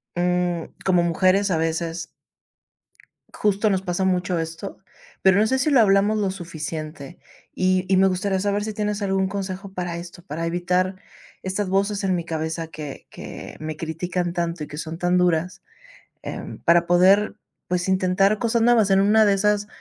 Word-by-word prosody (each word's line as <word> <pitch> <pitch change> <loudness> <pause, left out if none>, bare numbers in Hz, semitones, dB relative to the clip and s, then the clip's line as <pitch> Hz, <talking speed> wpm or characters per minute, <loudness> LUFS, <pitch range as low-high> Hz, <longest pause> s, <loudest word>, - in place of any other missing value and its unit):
mm, 175 -1 0 0.2
como 180 -2 +4
mujeres, 185 +4 +2
a 165 - +2
veces 165 +1 -2 1.2
justo 210 +1 +1
nos 190 -1 0
pasa 180 +1 -1
mucho 180 -1 0
esto, 165 +4 -5 0.4
pero 190 +1 +5
no 215 - +4
sé 265 +3 +1
si 295 +4 +1
lo 265 -4 +5
hablamos 205 +1 +4
lo 195 -2 0
suficiente, 160 -3 -6 0.4
y 185 0 +2
y 190 - +3
me 190 +1 +5
gustaría 190 +1 -1
saber 205 +1 0
si 215 - -3
tienes 210 0 -2
algún 190 -1 +1
consejo 190 -1 -5
para 175 -2 -4
esto, 170 0 -9
para 165 -2 -4
evitar 180 +2 0 0.5
estas 190 +1 -2
voces 200 +1 0
en 190 - +2
mi 170 - -3
cabeza 160 0 -3
que 150 -3 -8
que - - -9
me 155 0 -5
critican 170 +2 -3
tanto 170 -2 -2
y - - -10
que 150 - -8
son 160 +1 -5
tan 180 0 +2
duras, 180 0 0 0.6
em, - - -7
para 170 0 +4
poder, 190 +4 +4 0.3
pues, 180 0 -1
intentar 190 +2 +2
cosas 230 -1 +1
nuevas. 230 -4 +4
En 195 0 +5
una 215 +2 +5
de 200 - +4
esas, 205 +1 +1
185 Hz, 175 wpm, -23 LUFS, 170-200 Hz, 1.2 s, pero